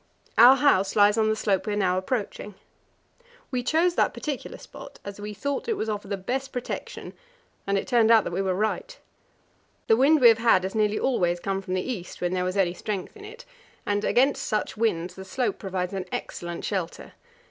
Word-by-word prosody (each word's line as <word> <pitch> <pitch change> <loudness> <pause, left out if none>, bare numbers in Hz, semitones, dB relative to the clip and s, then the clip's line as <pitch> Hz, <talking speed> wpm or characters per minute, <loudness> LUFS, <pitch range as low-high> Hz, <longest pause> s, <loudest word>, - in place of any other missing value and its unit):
Our 245 +4 +8
house 200 -9 +2
lies 205 0 +5
on 220 -1 +2
the 220 - +1
slope 200 -2 0
we 210 - -1
are - - -1
now 185 -3 +1
approaching. 205 0 -3 1.0
We 250 -2 -1
chose 330 +7 +2
that - - +1
particular 290 -4 -5
spot, - - -12
as 200 0 -8
we 210 0 -6
thought 280 - -3
it - - +2
would 220 - -3
offer 205 -1 -4
the 200 0 -3
best 260 +8 -3
protection, 250 -1 -6 0.5
and 200 0 +1
it - - -2
turned 235 -3 +3
out 225 -2 +6
that - - -5
we 190 - 0
were 190 -1 0
right. 220 - -2 0.9
The 225 - +4
wind 285 +6 +4
we 245 -3 +8
have 225 -1 +4
had 225 -5 +4
has 190 - -3
nearly 215 -1 +1
always 175 -9 0
come 195 +1 -2
from 185 -1 -4
the 185 - -1
east, 205 -9 -6
when 175 0 -1
there 180 -1 0
was 185 +2 -2
any 180 -3 +2
strength 195 0 -5
in 415 -1 -11
it, 460 +4 -11 0.4
and 205 0 0
against 270 +3 +2
such 215 - -2
winds 180 -6 -1
the 190 - -9
slope 245 +6 -2
provides 185 -2 -3
an 190 -2 -3
excellent 170 0 -5
shelter. 185 -5 -4
210 Hz, 210 wpm, -25 LUFS, 190-245 Hz, 1.0 s, Our